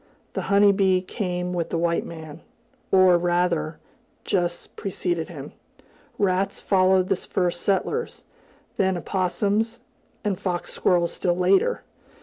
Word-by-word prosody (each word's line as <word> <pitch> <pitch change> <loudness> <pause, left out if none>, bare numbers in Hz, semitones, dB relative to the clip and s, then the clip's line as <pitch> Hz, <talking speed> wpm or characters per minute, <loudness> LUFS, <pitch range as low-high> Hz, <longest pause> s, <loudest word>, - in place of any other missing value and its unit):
The - - -2
honey 200 0 +6
bee 190 -2 +3
came 180 -3 -3
with 170 -2 -2
the - - -1
white 170 0 +1
man, 160 -1 -9 0.5
or 185 -2 +6
rather, 175 -2 0 0.5
just 175 -2 -2
preceded 175 -4 -2
him. 145 -4 -8 0.7
Rats 195 -1 0
followed 185 -1 +3
the 195 - +2
first 175 -1 -2
settlers, 435 - -1 0.5
then 190 -1 +2
opossums, 205 +6 -1 0.4
and 200 -3 -1
fox 180 -3 -3
squirrels 175 -2 +1
still 175 -1 0
later. 195 - +2
185 Hz, 125 wpm, -24 LUFS, 175-195 Hz, 0.7 s, honey